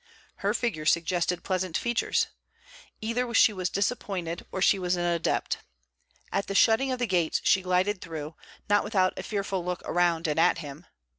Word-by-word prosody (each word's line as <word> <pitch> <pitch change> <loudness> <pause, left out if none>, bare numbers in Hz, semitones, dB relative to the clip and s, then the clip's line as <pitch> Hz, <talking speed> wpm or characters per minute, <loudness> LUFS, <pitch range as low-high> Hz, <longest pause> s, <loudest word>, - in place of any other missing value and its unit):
Her - - 0
figure 160 -11 -2
suggested 175 +1 +1
pleasant 185 -2 -1
features. 235 -1 +1 0.8
Either 235 +2 -1
she 220 - +6
was 185 -2 -2
disappointed 190 -5 -2
or - - -3
she 195 +1 +4
was 180 0 0
an 175 0 -1
adept. 170 -1 0 0.7
At 200 - -1
the 195 - -4
shutting 230 +6 +4
of 255 - -1
the 245 - 0
gates 175 -6 +1
she 190 - +4
glided 185 +2 +1
through, 160 -2 -6 0.3
not 205 0 +3
without 185 -4 +1
a - - -5
fearful 195 -3 -3
look 180 0 -4
around 175 -1 +1
and 150 +1 0
at 175 +2 +4
him. 150 +1 -9
185 Hz, 170 wpm, -27 LUFS, 170-205 Hz, 0.8 s, she